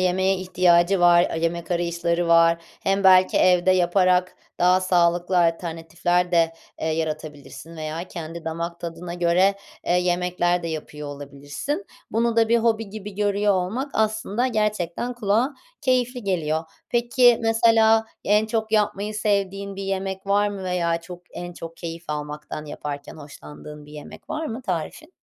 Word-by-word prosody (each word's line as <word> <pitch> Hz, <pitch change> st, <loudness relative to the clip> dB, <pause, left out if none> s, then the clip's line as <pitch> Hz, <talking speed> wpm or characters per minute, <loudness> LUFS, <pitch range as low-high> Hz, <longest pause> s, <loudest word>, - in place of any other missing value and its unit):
yemeğe 190 Hz, +1 st, +2 dB
ihtiyacı 180 Hz, 0 st, +3 dB
var, 175 Hz, 0 st, +6 dB
aaa, -, -, -4 dB
yemek 170 Hz, +1 st, -2 dB
arayışları 170 Hz, 0 st, 0 dB
var 165 Hz, 0 st, +5 dB, 0.2 s
hem 195 Hz, 0 st, 0 dB
belki 185 Hz, -1 st, +6 dB
evde 180 Hz, 0 st, +4 dB
yaparak 180 Hz, 0 st, +2 dB, 0.2 s
daha 180 Hz, +1 st, +4 dB
sağlıklı 175 Hz, 0 st, +2 dB
alternatifler 170 Hz, +1 st, 0 dB
de, 165 Hz, -1 st, +3 dB, 0.3 s
eee, -, -, -2 dB
yaratabilirsin 155 Hz, 0 st, -5 dB
veya 155 Hz, +2 st, -4 dB
kendi 165 Hz, -1 st, -7 dB
damak 170 Hz, +1 st, -4 dB
tadına 170 Hz, +1 st, -6 dB
göre, 180 Hz, +3 st, +3 dB, 0.3 s
eee, -, -, +2 dB
yemekler 180 Hz, 0 st, +1 dB
de 170 Hz, -, -3 dB
yapıyor 150 Hz, -2 st, -6 dB
olabilirsin. 145 Hz, -, -6 dB, 0.2 s
Bunu 230 Hz, 0 st, 0 dB
da 225 Hz, -1 st, +4 dB
bir 235 Hz, +1 st, +4 dB
hobi 225 Hz, -2 st, 0 dB
gibi 210 Hz, -1 st, -8 dB
görüyor 205 Hz, 0 st, +1 dB
olmak 220 Hz, +10 st, -2 dB
aslında 220 Hz, +2 st, 0 dB
gerçekten 210 Hz, -1 st, -1 dB
kulağa 235 Hz, +5 st, +1 dB, 0.3 s
keyifli 250 Hz, -2 st, 0 dB
geliyor. 160 Hz, -4 st, -1 dB, 0.2 s
Peki 240 Hz, 0 st, +4 dB
mesela 225 Hz, 0 st, +4 dB, 0.2 s
en 210 Hz, +1 st, +3 dB
çok 220 Hz, 0 st, -2 dB
yapmayı 210 Hz, 0 st, 0 dB
sevdiğin 200 Hz, -2 st, -1 dB
bir 195 Hz, -, -5 dB
yemek 195 Hz, 0 st, -3 dB
var 205 Hz, +1 st, +2 dB
mı 200 Hz, -1 st, -6 dB
veya 170 Hz, -2 st, 0 dB
çok 175 Hz, +1 st, -11 dB
en 175 Hz, 0 st, -7 dB
çok 165 Hz, -1 st, -9 dB
keyif 170 Hz, 0 st, -7 dB
almaktan 150 Hz, 0 st, -5 dB
yaparken 145 Hz, -1 st, -7 dB
hoşlandığın 145 Hz, -, -11 dB
bir 150 Hz, -, -14 dB
yemek 150 Hz, -1 st, -11 dB
var 315 Hz, +1 st, -3 dB
mı 235 Hz, +1 st, -6 dB
tarifin? 215 Hz, -, -4 dB
180 Hz, 145 wpm, -23 LUFS, 165-210 Hz, 0.3 s, var